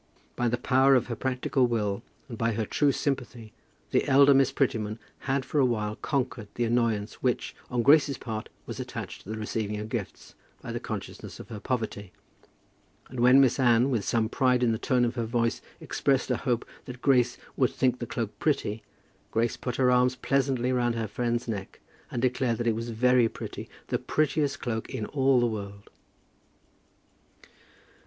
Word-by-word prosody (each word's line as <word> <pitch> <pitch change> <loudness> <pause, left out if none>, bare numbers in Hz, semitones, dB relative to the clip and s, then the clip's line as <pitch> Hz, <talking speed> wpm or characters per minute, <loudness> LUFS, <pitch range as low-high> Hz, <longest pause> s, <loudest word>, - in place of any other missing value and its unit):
By 120 - 0
the 120 +1 +1
power 130 +2 +4
of 125 - +2
her 115 - -2
practical 130 +1 0
will, 105 -3 -1 0.3
and 120 - -7
by 115 0 0
her 110 0 -1
true 145 +6 +2
sympathy, 125 -5 -3 0.4
the - - +2
elder 140 +1 +7
Miss 135 0 +4
Prettyman 110 -6 0 0.3
had 135 0 +1
for 145 +3 -1
a 135 - +5
while 110 -3 -1
conquered 125 -6 -2
the 120 - 0
annoyance 115 -3 0
which, - - -1
on 120 -1 0
Grace's 145 -1 +5
part, 110 -2 -5 0.2
was - - -7
attached - - -6
to - - -14
the 110 - -3
receiving 105 -1 -3
of 105 +1 -6
gifts, - - -5 0.3
by - - -7
the - - -3
consciousness - - -7
of - - -10
her 110 - -6
poverty; 110 -5 -3 1.0
and 130 - -7
when 125 +3 +7
Miss 135 -1 +4
Anne, 120 +1 +4
with 115 -5 0
some 115 +1 +1
pride 125 +1 +2
in 120 - +3
the 110 - -1
tone 125 -2 +2
of 120 - -1
her 120 -2 -2
voice, 115 0 0 0.2
expressed 135 -2 0
a 125 - +1
hope 120 -2 -1 0.2
that 125 0 -9
Grace 125 -3 +3 0.2
would - - +3
think 125 -1 0
the 120 - -4
cloak 115 -2 -3
pretty, 115 -8 0 0.5
Grace 115 +1 0
put 125 -2 -4
her 125 -1 +3
arms 125 0 +3
pleasantly 130 -2 0
round 120 -1 +1
her 115 -1 -2
friend's 120 +3 -2
neck, 100 -4 -5 0.3
and 120 - -3
declared 125 -2 +1
that 120 - -2
it 115 - +3
was 115 +1 -4
very 120 +1 +3
pretty, - - -7 0.2
the - - 0
prettiest 150 -1 0
cloak 110 -3 -3
in 120 -5 -3
all 135 -1 +3
the 120 - +3
world! 100 -3 -5
120 Hz, 185 wpm, -27 LUFS, 115-130 Hz, 1.0 s, elder